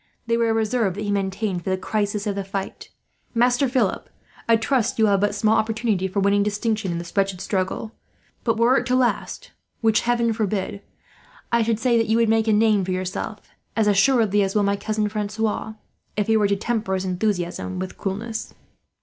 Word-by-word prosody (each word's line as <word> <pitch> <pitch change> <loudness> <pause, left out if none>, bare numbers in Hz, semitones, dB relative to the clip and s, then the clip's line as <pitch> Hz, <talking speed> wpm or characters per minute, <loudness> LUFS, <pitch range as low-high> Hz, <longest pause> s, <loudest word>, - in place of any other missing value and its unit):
They 230 0 +1
were 230 -1 +2
a - - +2
reserve 220 -3 0
that 210 - -4
he 205 - -1
maintained 195 -2 -1
for - - -3
the 185 - +1
crisis 205 +2 -2
of 205 - 0
the 200 0 -3
fight. 195 0 -6 0.5
"Master 245 +3 +3
Philip, 240 -7 0 0.4
I 230 - +7
trust 230 +1 +1
that - - -10
you - - +4
will 210 - +3
have 195 -1 +2
but 205 0 +1
small 215 +1 +3
opportunity 220 -4 0
for 190 +2 -2
winning 200 +1 +3
distinction 210 -1 -1
in 170 - -2
this 170 0 -8
wretched 195 -2 +1
struggle; 190 +3 -2 0.5
but 230 -2 +1
were 240 +3 +4
it - - -5
to 255 - +2
last, 255 -2 -1 0.3
which 220 -2 +3
heaven 235 -1 +1
forbid, 205 -2 -2 0.7
I 235 - +3
should 225 -1 +1
say 235 -1 +3
that 225 - +1
you 220 +1 +2
would 230 -1 +3
make 225 0 +2
a - - +4
name 210 -2 +3
for 185 - -5
yourself; 185 +3 -3 0.4
as 220 - +3
assuredly 210 0 +3
will 210 - +3
my 200 0 +2
cousin 215 +1 -1
Francois, 215 +1 -2 0.4
if 210 - +1
he 225 - +2
were 210 -2 +3
to 200 - +1
temper 215 -2 -1
his 190 0 -2
enthusiasm 185 -1 -2
with 185 0 -6
coolness." 220 +3 -4
210 Hz, 205 wpm, -23 LUFS, 195-225 Hz, 0.7 s, I